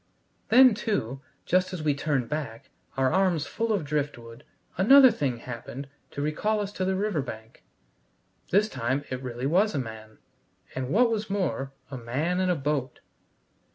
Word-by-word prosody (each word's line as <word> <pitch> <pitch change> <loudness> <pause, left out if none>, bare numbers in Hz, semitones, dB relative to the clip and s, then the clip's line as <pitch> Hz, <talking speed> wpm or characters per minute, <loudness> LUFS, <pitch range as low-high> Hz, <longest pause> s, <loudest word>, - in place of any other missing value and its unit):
Then, 255 0 +8
too, 135 - -2 0.2
just 185 +1 +1
as 170 -4 -4
we 150 -2 +2
turned 140 -3 -1
back, 145 -7 -5 0.3
our 130 -1 +2
arms 180 -5 +2
full 230 0 -2
of 195 -8 0
driftwood, 140 -4 -4 0.3
another 260 +7 +7
thing 140 - -2
happened 125 +3 -7 0.2
to 145 - -4
recall 210 +9 0
us 205 -1 -3
to 190 -2 -3
the 190 0 0
river 200 -5 0
bank. 110 -3 -9 0.9
This 205 +3 +3
time 130 - -2
it 130 0 -3
really 125 0 -5
was 185 +7 +2
a - - 0
man, 110 -3 -7 0.6
and 130 -1 -4
what 230 - +3
was 215 -2 -2
more, 135 - -1 0.2
a 130 - -5
man 145 +10 -1
in 185 -1 +1
a 180 - +2
boat. 140 -3 -2
150 Hz, 165 wpm, -27 LUFS, 130-195 Hz, 0.9 s, Then